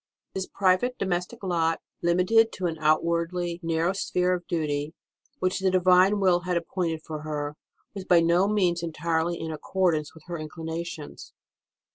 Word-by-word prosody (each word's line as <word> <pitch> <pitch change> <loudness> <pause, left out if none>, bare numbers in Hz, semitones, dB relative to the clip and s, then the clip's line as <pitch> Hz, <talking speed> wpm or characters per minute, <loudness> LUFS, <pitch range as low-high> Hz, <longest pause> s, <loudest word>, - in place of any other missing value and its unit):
This 190 -1 -3
private 195 +6 +1
domestic 180 0 -2
lot, 165 -3 +1 0.2
limited 180 +7 +3
to 185 - -4
an 165 -2 -2
outwardly 170 +3 +1
narrow 165 +2 0
sphere 180 -2 0
of 175 -1 -4
duty, 150 -2 -2 0.4
which 185 +1 0
the 190 0 +2
Divine 185 +2 +4
will 185 -3 +4
had 180 0 -1
appointed 170 -2 -2
for 155 -1 -6
her, 150 -1 -4 0.4
was 195 -2 -6
by 175 -2 +5
no 170 +3 +3
means 185 -5 +1
entirely 165 +1 -1
in 160 0 -4
accordance 160 -1 -1
with 160 - -15
her 175 -1 -5
own 155 - -5
inclinations. 160 -1 -7
175 Hz, 155 wpm, -26 LUFS, 160-185 Hz, 0.4 s, by